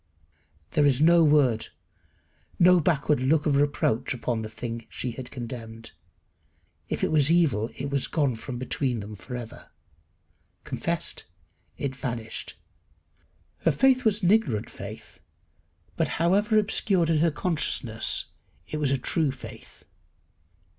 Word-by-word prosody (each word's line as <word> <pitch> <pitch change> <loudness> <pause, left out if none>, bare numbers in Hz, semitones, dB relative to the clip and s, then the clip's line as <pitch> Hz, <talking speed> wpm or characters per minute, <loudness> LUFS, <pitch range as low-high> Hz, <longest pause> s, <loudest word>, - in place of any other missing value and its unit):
There 145 -1 +3
is 135 -2 +2
no 170 +2 +6
word, 140 -7 +3 0.9
no 180 0 +6
backward 150 -3 +1
look 145 +4 +2
of 145 -3 +2
reproach 135 -3 +1
upon 120 -2 -2
the 110 - -5
thing 115 +1 -6
she 125 - -4
had 125 +2 -8
condemned. 115 -2 -8 1.0
If - - -3
it - - +1
was 150 -2 +4
evil 155 -10 +2
it 140 +1 -4
was 140 -2 +1
gone 145 -5 +1
from 120 +3 -6
between 130 -1 -1
them 105 +1 -7
for 125 +5 -8
ever. 120 -2 -9 0.9
Confessed, - - -3 0.5
it 135 -1 -3
vanished. 120 -4 -5 1.0
Her - - +2
faith 260 -1 +3
was 215 -2 +1
an 180 - +4
ignorant 205 - +1
faith, - - -9 0.8
but, - - +1
however 205 +6 +3
obscured 195 -5 +2
in 155 - +3
her 165 +2 +4
consciousness, 150 -8 -1 0.4
it 155 - -4
was 150 -3 +1
a 135 - +2
true 150 +3 +1
faith. 130 -1 -11
140 Hz, 135 wpm, -26 LUFS, 120-165 Hz, 1.0 s, no